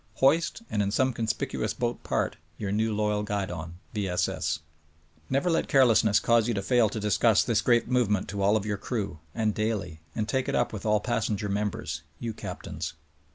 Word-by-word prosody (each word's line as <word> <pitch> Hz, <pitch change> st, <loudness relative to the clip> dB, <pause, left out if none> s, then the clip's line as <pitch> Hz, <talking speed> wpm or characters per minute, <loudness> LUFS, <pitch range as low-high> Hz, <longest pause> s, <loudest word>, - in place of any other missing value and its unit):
(Hoist, 160 Hz, -, +2 dB
and 105 Hz, -, 0 dB
in 100 Hz, -, +1 dB
some 130 Hz, +5 st, +2 dB
conspicuous 110 Hz, -1 st, -2 dB
boat 120 Hz, 0 st, -2 dB
part, -, -, -1 dB, 0.2 s
j^our 100 Hz, -2 st, -2 dB
new 110 Hz, +2 st, +1 dB
loyal 105 Hz, 0 st, +1 dB
guidon— 95 Hz, -5 st, -3 dB, 0.2 s
V. 105 Hz, -3 st, -1 dB
S. 90 Hz, -, +1 dB
S. 80 Hz, -1 st, -2 dB, 0.4 s
!) 80 Hz, -1 st, -34 dB
Never 135 Hz, +6 st, +1 dB
let 165 Hz, -2 st, +2 dB
carelessness 115 Hz, -7 st, +5 dB
cause 115 Hz, -1 st, +3 dB
you 120 Hz, -, 0 dB
to 100 Hz, -, -2 dB
fail 120 Hz, -1 st, +3 dB
to 110 Hz, -, -4 dB
discuss 105 Hz, +1 st, +3 dB
this 115 Hz, -2 st, +1 dB
great 120 Hz, 0 st, +3 dB
movement 115 Hz, -6 st, +1 dB
to 100 Hz, 0 st, -3 dB
all 100 Hz, +2 st, +4 dB
of 105 Hz, -, -4 dB
your 105 Hz, -1 st, -1 dB
crew, 100 Hz, -5 st, -3 dB, 0.2 s
and 110 Hz, -1 st, +1 dB
daily 100 Hz, -7 st, -2 dB
— -, -, -33 dB
and 105 Hz, -1 st, -1 dB
take 130 Hz, +4 st, 0 dB
it -, -, 0 dB
up 120 Hz, -, +1 dB
with 110 Hz, 0 st, -4 dB
all 105 Hz, -1 st, +3 dB
passenger 110 Hz, -3 st, -1 dB
members 105 Hz, 0 st, -2 dB
— -, -, -36 dB
^you 115 Hz, -2 st, -4 dB
captains -, -, -6 dB
105 Hz, 205 wpm, -28 LUFS, 100-115 Hz, 0.4 s, carelessness